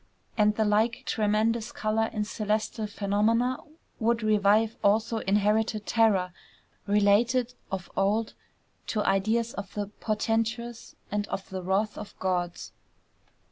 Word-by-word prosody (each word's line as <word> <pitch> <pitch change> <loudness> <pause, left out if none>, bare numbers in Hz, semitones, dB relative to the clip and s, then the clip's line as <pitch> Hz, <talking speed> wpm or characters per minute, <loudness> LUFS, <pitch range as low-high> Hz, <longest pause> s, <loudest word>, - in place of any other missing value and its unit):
And 210 -1 +3
the 220 - +1
like 220 +3 +1
tremendous 220 +2 +1
color 220 +1 0
in 210 - -1
celestial 215 +1 -2
phenomena 215 +5 +1 0.4
would 230 0 +1
revive 215 +1 +3
also 220 +3 +2
inherited 210 +1 +1
terror 200 -6 +2 0.5
related 225 +5 +3 0.2
of 190 -2 -4
old 210 +3 +1 0.5
to 215 -2 0
ideas 220 +5 +1
of 200 -1 -6
the 205 -1 -1
portentous 225 +2 -2 0.2
and 205 0 -1
of 195 - -5
the 190 -1 -4
wrath 195 +4 0
of - - -9
gods. 180 -2 -2
215 Hz, 120 wpm, -27 LUFS, 205-225 Hz, 0.5 s, And